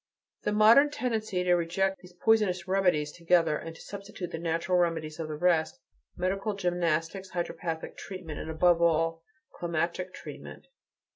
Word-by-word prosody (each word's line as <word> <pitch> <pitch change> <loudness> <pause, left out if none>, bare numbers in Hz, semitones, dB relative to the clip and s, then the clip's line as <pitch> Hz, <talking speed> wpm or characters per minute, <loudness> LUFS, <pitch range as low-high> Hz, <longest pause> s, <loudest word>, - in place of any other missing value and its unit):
The 210 - -1
modern 225 +7 +6
tendency 225 -8 -2
is - - -3
to 180 - +4
reject 175 +3 0
these 180 0 -15
poisonous 200 -5 +3
remedies 180 -6 +2
altogether, 170 -2 +2
and 165 +2 -6
to - - -13
substitute 195 -3 -7
the 165 - -4
natural 170 +2 0
remedies 165 -3 -1
of 160 -1 -4
rest, 160 -3 +1 0.4
medical 195 +3 -1
gymnastics, 175 0 -1
hydropathic 170 -2 -4
treatment, 180 -6 -7
and, - - -6
above 170 +1 +3
all, 165 0 +2 0.3
climatic 170 +2 -2
treatment. - - -10
175 Hz, 145 wpm, -29 LUFS, 165-195 Hz, 0.4 s, modern